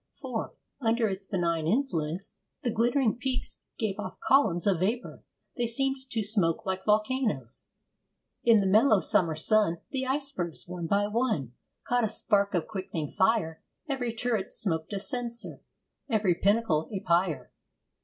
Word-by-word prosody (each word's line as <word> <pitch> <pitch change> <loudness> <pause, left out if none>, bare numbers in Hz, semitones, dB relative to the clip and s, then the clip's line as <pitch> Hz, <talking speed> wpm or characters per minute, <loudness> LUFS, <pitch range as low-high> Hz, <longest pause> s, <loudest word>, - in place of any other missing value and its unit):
For, - - -5 0.2
under 230 -2 +2
its 195 -1 -5
benign 170 -4 0
influence, 180 - -1 0.3
the 240 - 0
glittering 240 +1 +2
peaks 255 0 -3 0.2
gave 210 -4 -2
off - - -6
columns 225 -11 +3
of 195 -5 +2
vapour. 220 +7 -2 0.3
They 240 -1 +1
seemed 265 +2 -1
to 225 -3 -1
smoke 205 -1 +2
like 190 0 -3
volcanoes. 215 - 0 0.8
In 230 -3 +6
the - - -1
mellow 215 +3 +5
summer 165 -3 +1
sun, 190 +1 +4
The 265 -1 -1
icebergs, 265 - -3
one 175 -2 -5
by 200 +3 +2
one, 210 - -1 0.3
Caught 245 0 +1
a 220 - +1
spark 200 -2 +1
of 170 - 0
quickening 185 -8 -5
fire, 190 -5 +1 0.3
Every 265 -5 -1
turret 225 -3 -2
smoked 160 -5 -2
a 200 - -2
censer, 235 +3 -4 0.5
Every 210 -6 +2
pinnacle 195 -4 +1
a 200 - -2
pyre. 175 -3 0
210 Hz, 145 wpm, -28 LUFS, 180-240 Hz, 0.8 s, In